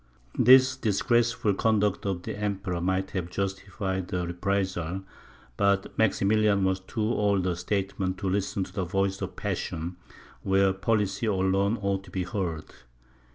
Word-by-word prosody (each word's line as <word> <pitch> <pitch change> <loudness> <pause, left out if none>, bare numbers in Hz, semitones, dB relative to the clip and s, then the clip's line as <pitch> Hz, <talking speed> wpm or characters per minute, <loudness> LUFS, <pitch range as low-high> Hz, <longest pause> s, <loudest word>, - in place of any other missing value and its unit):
This 130 +1 +7
disgraceful 115 -1 +1
conduct 105 -1 +1
of 90 -3 -2
the - - -4
Emperor 100 -4 -2
might 95 +2 0
have 90 -3 -3
justified 95 -1 -3
a 90 -1 -1
reprisal, 95 0 -2 0.5
but 100 -1 +1
Maximilian 105 -1 +3
was 95 0 +1
too 105 +4 -4
old 105 -4 +1
a 90 -2 0
statesman 95 0 -2
to 95 +1 -4
listen 95 0 0
to - - -10
the 95 - -1
voice 95 +2 -1
of 95 -1 -4
passion, 90 -3 -3 0.4
where 95 0 +3
policy 105 +2 0
alone 100 +2 +1
ought 100 -1 0
to - - -13
be 90 +1 -2
heard. 90 -6 -3
95 Hz, 145 wpm, -27 LUFS, 95-105 Hz, 0.5 s, This